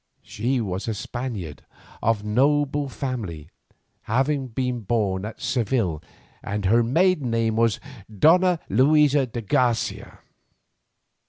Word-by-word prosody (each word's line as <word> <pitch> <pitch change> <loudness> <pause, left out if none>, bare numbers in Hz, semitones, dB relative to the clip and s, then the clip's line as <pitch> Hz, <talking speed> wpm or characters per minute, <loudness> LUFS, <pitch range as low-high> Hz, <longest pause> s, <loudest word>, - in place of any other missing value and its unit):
She 125 +5 -2
was 95 -1 -4
a 110 - -1
Spaniard 105 - -6 0.4
of 110 -2 +1
noble 145 +5 +1
family, 105 - -5 0.6
having 135 +3 +1
been 125 +1 -2
born 100 -3 -1
at 110 - -8
Seville, 115 - -1 0.4
and 105 0 -4
her 115 +5 +4
maiden 150 +3 +2
name 115 -1 0
was 115 -1 +2 0.3
Donna 175 - +4
Luisa 140 +3 +4
de 120 0 -5
Garcia. 120 0 0
120 Hz, 110 wpm, -24 LUFS, 105-135 Hz, 0.6 s, her